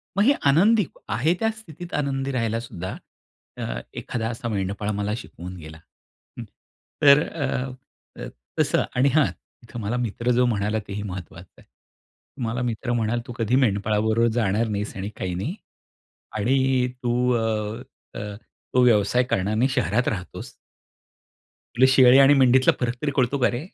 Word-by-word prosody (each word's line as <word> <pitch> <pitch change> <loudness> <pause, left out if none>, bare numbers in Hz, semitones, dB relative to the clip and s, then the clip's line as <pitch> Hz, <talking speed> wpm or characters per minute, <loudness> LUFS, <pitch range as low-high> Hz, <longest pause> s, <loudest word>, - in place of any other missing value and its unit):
मग 200 - +3
हे 275 +6 +5 0.2
आनंदी 200 +8 +4 0.2
आहे 130 +10 +2
त्या 225 - +2
स्थितीत 175 -4 -11
आनंदी 140 -2 -1
राहायला 115 -3 -1
सुद्धा, 95 -6 -6 0.6
अ, - - -4 0.2
एखादा 115 -2 -3
असा 120 0 -5
मेंढपाळ 100 0 -2
मला 105 +1 -1
शिकवून 90 -5 -9
गेला. 80 -1 -10 0.6
हं, - - -5 0.6
तर 140 0 +7
अ, 135 -4 -3 0.5
अ, - - -5 0.3
तसं - - +2
आणि 130 +3 +4
हां, 155 -2 +5 0.4
इथं 120 0 -9
मला 110 +4 -2
मित्र 120 0 -1
जो 125 +1 +3
म्हणाला 105 -2 0
तेही 100 +1 -5
महत्वाचं 95 -4 -9
आहे. - - -23 0.8
मला 115 +2 -2
मित्र 120 0 -2
म्हणाला 120 0 0
तू 120 - -6
कधी 115 +1 +1
मेंढपाळाबरोबर 110 -1 +2
जाणार 110 0 +1
नाहीस 105 0 -3
आणि 95 +1 -4
काही 90 -1 -3
नाही. 135 - -3 0.8
आणि 130 +3 +2 0.2
तू 125 +1 +1
अ, 110 0 -2 0.4
अ, 105 -1 -6 0.4
तो 125 - +5
व्यवसाय 120 +1 +4
करणार 105 -4 -1
नाही 125 +5 +2
शहरात 120 0 0
राहतोस 90 -4 -5 1.3
तुला 130 - +6
शेळी 130 -1 +7
आणि 135 +1 +7
मेंढीतला 130 -1 +5
फरक 125 -1 0
तरी 150 - 0
कळतो 130 +1 +1
का 125 - +3
रे? 125 +6 -4
120 Hz, 155 wpm, -24 LUFS, 105-130 Hz, 1.3 s, तर